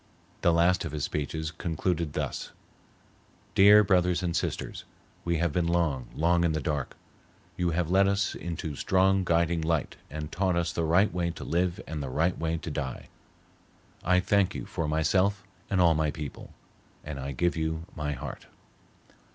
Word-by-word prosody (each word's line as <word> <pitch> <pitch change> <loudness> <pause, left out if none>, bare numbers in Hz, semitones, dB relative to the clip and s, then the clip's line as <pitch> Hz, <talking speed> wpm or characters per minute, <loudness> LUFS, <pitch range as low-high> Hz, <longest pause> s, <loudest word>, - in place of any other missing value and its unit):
The 85 - +4
last 85 +2 +3
of 80 -3 -5
his 75 -2 -3
speeches 80 +2 -3
concluded 85 -1 -2
thus: - - -3 1.0
"Dear 105 +2 +8
Brothers 90 -2 +2
and 85 -2 -1
Sisters, - - -3 0.4
we 85 -1 0
have 85 -2 0
been 85 0 +1
long, 80 -7 0
long 85 +2 +2
in 85 -2 +2
the 80 - 0
dark. 75 -1 -3 0.6
You 90 -1 0
have 85 0 -1
led 95 +1 +5
us 100 0 +1
into 80 -3 -5
strong 95 +4 +2
guiding 85 -1 +1
light 80 -2 -1
and 75 0 -6
taught 95 -2 +1
us 85 -2 0
the 85 - -1
right 90 +6 +3
way 85 -1 0
to 85 - -7
live 90 +1 0
and 80 -2 -5
the 70 - -4
right 85 +7 +1
way 80 0 -1
to 80 0 -6
die. 70 -4 -5 0.9
I 90 0 +4
thank 95 -1 +2
you 65 - -4
for 80 - -3
myself 95 +6 +1 0.3
and 95 - +1
all 85 -2 +6
my 80 0 +1
people, 75 -1 -7 0.5
and 75 -2 -6
I 70 +1 -4
give 85 +6 0
you 80 0 -2
my 75 -1 -2
heart." 70 +1 -7
85 Hz, 175 wpm, -28 LUFS, 75-90 Hz, 1.0 s, Dear